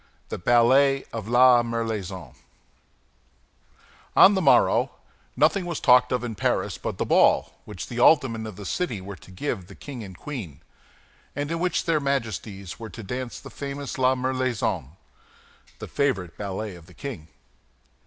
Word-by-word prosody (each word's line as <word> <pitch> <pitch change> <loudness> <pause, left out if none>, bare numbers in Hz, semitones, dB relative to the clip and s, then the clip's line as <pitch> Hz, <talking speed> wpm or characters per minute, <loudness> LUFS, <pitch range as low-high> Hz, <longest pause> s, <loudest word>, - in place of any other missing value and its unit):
THE - - -5
BALLET 130 +6 +4
OF 110 -2 -5
LA 120 +1 +6
MERLAISON 110 -6 -4 1.8
On 200 - +8
the 190 - +1
morrow, - - +4 0.5
nothing 190 -3 +2
was 170 -3 -3
talked 125 -1 +5
of 125 -1 0
in 120 -2 -3
Paris 105 - -1
but - - -4
the - - -1
ball - - +3
which 105 -3 -7
the 120 - -6
aldermen 120 -5 +4
of 110 - -8
the 100 +1 -9
city 125 - -2
were 95 +2 -8
to - - -17
give 95 +6 -3
to - - -15
the - - -13
king 130 -5 -8
and 95 -3 -10
queen, 105 - -7 0.7
and 145 +2 -3
in 165 - -1
which 180 +1 0
their 165 -2 +2
Majesties 110 -8 -3
were 115 -1 -7
to 115 - -9
dance 125 +4 -5
the - - -11
famous 140 -1 -6
La 130 0 +4
Merlaison—the 125 - -5
favorite 105 - -1
ballet 100 +1 -5
of 85 -2 -15
the - - -17
king. 120 - -7
120 Hz, 160 wpm, -25 LUFS, 100-135 Hz, 1.8 s, On